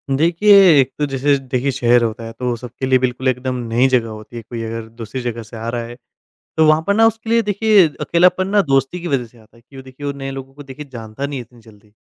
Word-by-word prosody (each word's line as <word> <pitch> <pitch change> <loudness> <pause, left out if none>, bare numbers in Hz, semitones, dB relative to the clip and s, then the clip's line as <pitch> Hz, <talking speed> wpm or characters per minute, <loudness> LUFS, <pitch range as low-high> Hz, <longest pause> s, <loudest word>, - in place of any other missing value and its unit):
देखिए, 170 +7 +2 0.3
एक 130 - -2
तो 145 - +1
जैसे 140 +1 +1
देखिए 130 +2 0
शहर 120 -1 +3
होता 115 0 -3
है 115 - -7
तो 125 -1 -2
सबके 125 +2 -7
लिए 130 0 +3
बिल्कुल 130 +1 -2
एकदम 130 0 -1 0.2
नई 125 +3 +3
जगह 120 -3 +1
होती 110 +2 -11
है, 115 - -5
कोई 115 +1 -7
अगर 115 0 -5
दूसरी 115 +3 -5
जगह 120 -1 -4
से 115 +1 -11
आ 115 +1 -6
रहा 120 0 -3
है 120 +1 -10 0.6
तो 160 - +5
वहाँ 155 +1 +4
पर 200 - +3
ना 225 +2 +4
उसके 225 0 -4
लिए 230 0 +4
देखिए 210 -3 +3
अकेलापन 180 +2 +2
ना 205 +1 +3
दोस्ती 135 +2 0
की 175 - -5
वज़ह 135 -5 -1
से 120 - -23
आता 110 +1 -22
है। - - -21
क्यों 135 +2 -13
देखिए 130 +2 -11
वो 140 - -1
नए 135 0 -5
लोगों 135 0 -8
को 145 +1 -12
देखिए 140 +2 -10
जानता 115 +3 -6
नहीं 140 -2 -5
है - - -5
इतनी 120 0 -17
जल्दी 105 -2 -20
130 Hz, 260 wpm, -18 LUFS, 115-145 Hz, 0.6 s, तो